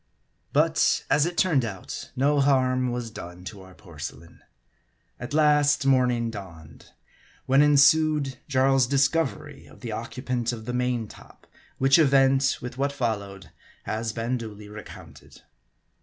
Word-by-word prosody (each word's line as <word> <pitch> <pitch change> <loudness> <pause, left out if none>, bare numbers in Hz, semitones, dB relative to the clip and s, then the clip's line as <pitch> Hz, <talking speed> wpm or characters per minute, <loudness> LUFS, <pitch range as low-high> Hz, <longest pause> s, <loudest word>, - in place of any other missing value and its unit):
But - - +2
of 145 +2 +4
it 175 - -6
turned 160 -9 +2
out, 100 -5 -7
no 145 +3 +2
harm 130 -2 +2
was 120 -2 -5
done 90 -4 -10
to 100 +1 -9
our 95 -1 -15
porcelain. 85 -1 -10 0.8
At 120 - -7
last, 150 -2 +3
morning 125 -3 +2
dawned; 85 -7 -11 0.6
when 135 +2 +4
ensued 150 -1 +4
Jarl's 135 -1 +2
discovery 145 +1 -1
as - - -16
the 115 - -6
occupant 120 +2 -3
of 110 -2 -8
the 125 - -4
main 125 -2 -1
top; - - -17 0.3
which 135 +3 +4
event, 135 -2 +3
with 125 +1 -8
what 140 +1 0
followed, 100 -7 -4 0.3
has 110 +1 -3
been 115 +3 -3
duly 105 -2 -9
recounted. 105 +1 -13
125 Hz, 135 wpm, -25 LUFS, 110-140 Hz, 0.8 s, of